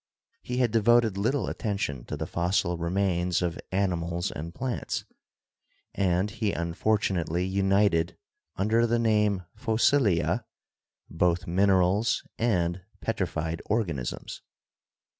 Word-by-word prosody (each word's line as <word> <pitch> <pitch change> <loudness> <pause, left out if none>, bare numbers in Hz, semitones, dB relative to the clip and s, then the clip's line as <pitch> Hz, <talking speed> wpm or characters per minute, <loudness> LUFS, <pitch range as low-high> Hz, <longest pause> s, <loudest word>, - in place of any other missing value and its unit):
He 125 - -4
had 125 -3 +2
devoted 115 -1 +4
little 115 +8 0
attention 100 - -3
to 75 - -5
the 80 - -3
fossil 85 +1 0
remains 90 0 0
of 85 -2 -2
animals 85 -2 -1
and 80 +3 -6
plants, 125 +7 -3 0.9
and 95 +1 +1
he 100 +1 -1
unfor 85 +6 +1
tunately 90 -2 -1
united 95 -3 +2 0.4
under 110 +4 +2
the 120 +1 +2
name 105 -5 +2
"Fossilia" 110 - +2 0.6
both 90 +2 +1
minerals 95 +4 +2 0.2
and 90 -6 +1 0.2
petrified 80 -6 -2
organisms. 85 - -2
95 Hz, 105 wpm, -27 LUFS, 85-110 Hz, 0.9 s, devoted